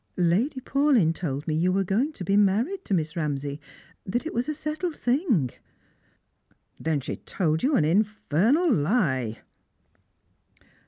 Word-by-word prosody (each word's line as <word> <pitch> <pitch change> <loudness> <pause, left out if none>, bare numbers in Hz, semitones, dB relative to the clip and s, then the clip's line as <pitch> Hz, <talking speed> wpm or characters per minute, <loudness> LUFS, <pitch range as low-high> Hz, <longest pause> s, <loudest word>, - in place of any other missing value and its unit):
" - - -43
Lady 195 - +1
Paulyn 265 - +2
told 145 -4 -4
me 155 - 0
that 155 - 0
you 180 +1 +2
were 195 +1 +1
going 220 - 0
to 240 - -8
be 195 +3 +1
married 220 - +2
to - - -2
Mi?s 160 -2 -1
Kamsay; 145 -3 -3 0.4
that 240 +10 -2
it 325 - -4
was 245 +5 -1
a - - 0
settled 310 +3 -3
thing." 240 - +1 0.6
" - - -42
Then 155 -3 -1
she 135 - -5
told 160 -4 -1
you 280 +2 +2
an 155 - +3
infernal 215 - +2
lie." 145 - 0
195 Hz, 160 wpm, -26 LUFS, 155-265 Hz, 0.6 s, an